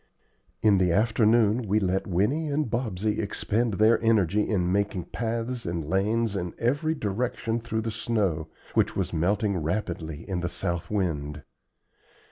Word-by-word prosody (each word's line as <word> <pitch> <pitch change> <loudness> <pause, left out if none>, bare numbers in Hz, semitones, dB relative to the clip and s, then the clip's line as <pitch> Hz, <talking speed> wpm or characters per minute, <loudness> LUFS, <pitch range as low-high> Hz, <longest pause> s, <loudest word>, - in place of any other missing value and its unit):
In 105 -3 +5
the 90 -2 +3
afternoon 110 +2 +3
we 105 +3 +3
let 95 -1 0
Winnie 105 - +1
and 150 0 0
Bobsey 110 -4 -1
expend 110 +1 -1
their 110 +3 +4
energy 105 -3 +2
in 90 -4 +1
making 100 -2 0
paths 115 0 -3
and 85 -2 -2
lanes 105 +5 +1
in 90 -2 -3
every 145 +7 +1
direction 115 0 -2
through 110 -1 -2
the 110 0 -3
snow, 95 -9 -1 0.3
which - - +2
was - - -2
melting 100 +4 +1
rapidly 80 -2 -3
in 95 -3 -2
the 85 0 -2
south 85 -1 -3
wind. 75 -8 -2
105 Hz, 145 wpm, -27 LUFS, 90-115 Hz, 0.3 s, In